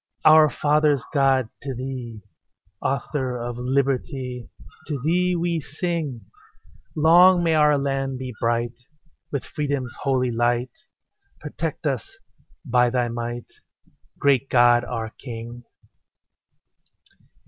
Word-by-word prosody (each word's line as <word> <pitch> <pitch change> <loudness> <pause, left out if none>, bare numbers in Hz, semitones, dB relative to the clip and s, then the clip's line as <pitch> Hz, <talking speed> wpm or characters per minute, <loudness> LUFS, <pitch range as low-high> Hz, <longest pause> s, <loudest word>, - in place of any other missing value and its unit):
Our 155 0 +8
fathers' 145 -1 +2
God, 135 -4 +2
to 135 -2 -5
Thee, 125 -4 -6 0.6
Author 135 -2 -2
of 120 0 -5
liberty, 130 -1 -2 0.4
To 145 -3 -3
Thee 180 +6 +1
we 170 -1 0
sing: 155 -4 -3 0.7
Long 175 +3 +6
may 165 -1 +2
our 150 -1 +4
land 135 -1 -2
be 130 -1 -6
bright 120 +1 -1 0.5
With 140 - -3
freedom's 140 -5 -3
holy 130 -3 +1
light: 120 +1 0 0.7
Protect 155 +1 -5
us 135 -7 -3 0.5
by 125 0 +3
Thy 120 -1 0
might, 120 +1 -4 0.7
Great 135 -1 +2
God, 120 -1 +5
our 115 -2 -4
King. 120 -1 -8
135 Hz, 105 wpm, -23 LUFS, 120-150 Hz, 0.7 s, Our